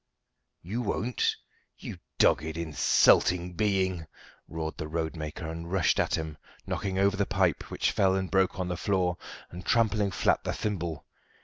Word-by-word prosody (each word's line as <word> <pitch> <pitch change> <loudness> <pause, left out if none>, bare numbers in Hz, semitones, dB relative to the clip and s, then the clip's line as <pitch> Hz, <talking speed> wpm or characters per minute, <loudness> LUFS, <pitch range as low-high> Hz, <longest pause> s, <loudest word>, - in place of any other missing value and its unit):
"You 105 +8 -3
won't, 120 +2 0 0.4
you - - -8 0.2
dogged, 80 +3 +3
insulting 85 +2 +3
being?" 95 -4 0 0.4
roared 80 -1 -5
the 80 - -4
roadmaker, 80 0 -4
and 85 +1 -6
rushed 95 -4 +2
at - - +2
him, 80 -2 -5 0.3
knocking 95 -2 -2
over 100 +1 +3
the 100 -1 0
pipe, 95 -5 +1
which - - 0
fell 95 -1 +3
and 95 -1 -2
broke 95 0 +2
on 90 - -1
the 90 - -2
floor, 90 -3 0 0.3
and 90 +2 -8
trampling 105 -3 +2
flat - - +1
the - - -2
thimble. 85 -8 -3
90 Hz, 150 wpm, -28 LUFS, 80-100 Hz, 0.4 s, dogged